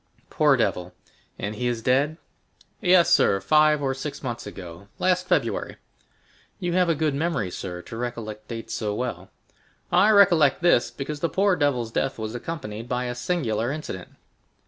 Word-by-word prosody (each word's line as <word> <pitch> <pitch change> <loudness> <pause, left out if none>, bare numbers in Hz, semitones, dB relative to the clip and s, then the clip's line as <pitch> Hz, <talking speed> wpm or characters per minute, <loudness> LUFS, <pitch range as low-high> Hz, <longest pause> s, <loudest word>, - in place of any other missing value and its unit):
"Poor 150 -3 +4
devil!—and 90 0 -4
he 125 - -1
is 120 -2 -2
dead?" 140 +6 +2 0.6
"Yes, 180 -3 +5
sir, 100 - +4
five 150 +7 +3
or 135 -1 +1
six 140 +3 -6
months 120 -4 -4
ago, 90 -1 -10
last 180 0 +1
February." 180 - 0 0.8
"You 175 -3 -2
have 180 -1 +3
a 165 - +3
good 155 -1 0
memory, 140 - -1
sir, 90 -1 -6
to 115 - -9
recollect 115 -3 -5
dates 115 -1 -6
so 105 -2 -2
well." 125 +3 -4 0.6
"I 185 +4 +5
recollect 175 -8 +5
this, 175 -9 +4
because 135 +5 -6
the 170 - 0
poor 195 +4 +2
devil's 130 -8 0
death 135 +3 -1
was 110 0 -5
accompanied 120 -5 -6
by 125 0 -1
a 125 - -3
singular 125 -5 -1
incident." 140 - -6
130 Hz, 160 wpm, -24 LUFS, 110-160 Hz, 0.8 s, Yes